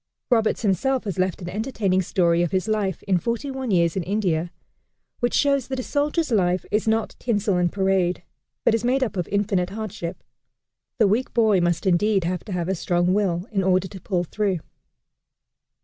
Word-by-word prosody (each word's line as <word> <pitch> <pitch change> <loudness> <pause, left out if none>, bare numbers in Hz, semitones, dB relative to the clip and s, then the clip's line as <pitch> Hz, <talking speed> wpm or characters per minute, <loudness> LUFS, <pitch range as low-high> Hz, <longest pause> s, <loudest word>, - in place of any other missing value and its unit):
Roberts 225 -1 +2
himself 240 +7 +1
has 195 -4 -4
left 185 0 -1
an 175 - -5
entertaining 205 -3 0
story 170 -2 +2
of 175 - +1
his 190 +3 -1
life 205 -5 -1
in 190 -3 +1
"Forty 235 - -2
One 265 -2 -4
Years 170 -4 +2
in 190 - 0
India," 175 -3 -1 0.7
which 240 - 0
shows 280 -3 +2
that 265 -1 -3
a - - -3
soldier's 295 +2 0
life 180 -4 +2
is 210 +1 0
not 220 0 0
tinsel 210 -4 0
and 175 -1 +1
parade, 190 -2 +1 0.4
but - - +4
is 225 0 0
made 260 +2 +2
up 220 -4 -3
of 180 -2 -2
infinite 200 -3 0
hardship. 195 -5 -6 0.7
The 220 -4 +4
weak 225 +6 0
boy 215 -5 +4
must 175 0 0
indeed 195 +2 +2
have 180 +1 -2
to 210 - -8
have 175 -2 -2
a 190 - +1
strong 175 0 +1
will 190 -2 0
in 195 -3 +1
order 185 0 +2
to 190 -3 -10
pull 180 -4 -1
through. 190 -1 -1
195 Hz, 190 wpm, -23 LUFS, 180-220 Hz, 0.7 s, but